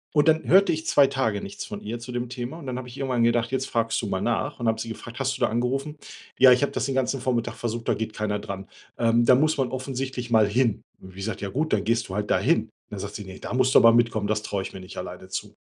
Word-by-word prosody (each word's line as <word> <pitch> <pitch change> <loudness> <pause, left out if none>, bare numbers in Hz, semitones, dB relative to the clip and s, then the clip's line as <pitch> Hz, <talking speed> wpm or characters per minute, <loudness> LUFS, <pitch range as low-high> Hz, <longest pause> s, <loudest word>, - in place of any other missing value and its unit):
Und 150 +2 +4
dann 160 0 +3
hörte 190 -1 +5
ich 160 +1 -4
2 140 -1 +5
Tage 115 -7 -1
nichts 100 - -7
von 105 - -7
ihr 115 +3 -4
zu 125 +2 -8
dem 120 0 -3
Thema 125 +5 -6
und 145 - -10
dann 125 -1 -3
hab 125 - -7
ich 125 +2 -10
irgendwann 125 -4 +1
gedacht: 120 0 +2
„Jetzt 130 0 -1
fragst 115 -1 0
du - - -3
mal - - -2
nach“, - - -1
und 115 - 0
hab 110 0 +1
sie 115 0 -5
gefragt: 115 +3 -8
„Hast 135 0 -1
du - - -13
da - - +3
angerufen?“ 135 +6 -1 0.4
„Ja, 130 -1 +8
ich 125 - +3
hab 140 - +1
das - - -1
den 135 - -2
ganzen 130 0 0
Vormittag 120 -2 -1
versucht, 115 0 -4
da - - +3
geht 110 -1 -4
keiner 105 -1 -2
dran. 100 -1 -7 0.3
Ähm, 115 0 +3
da 125 - +6
muss 155 +4 +2
man 130 -3 0
offensichtlich 130 -2 -4
mal 110 -2 +5
hin.“ 115 0 +1 0.2
Hab 95 - -11
ich 95 - -17
gesagt: 100 +3 -4
„Ja 100 - -3
gut, 155 +9 -2
dann 105 -2 +2
gehst 115 -2 0
du 95 - -6
halt 105 0 -2
dahin. - - +2 0.2
Dann - - -6
sagt - - -6
sie: 105 - -6
„Ne, 95 0 -10
da - - -5
musst 130 0 +2
du - - +9
aber 115 0 +7
mitkommen, 115 -3 +2
das 105 0 0
traue 100 -2 -2
ich - - -7
mir 95 - -7
nicht 95 - -10
alleine - - -7
zu.“ - - -5
120 Hz, 290 wpm, -25 LUFS, 110-130 Hz, 0.4 s, du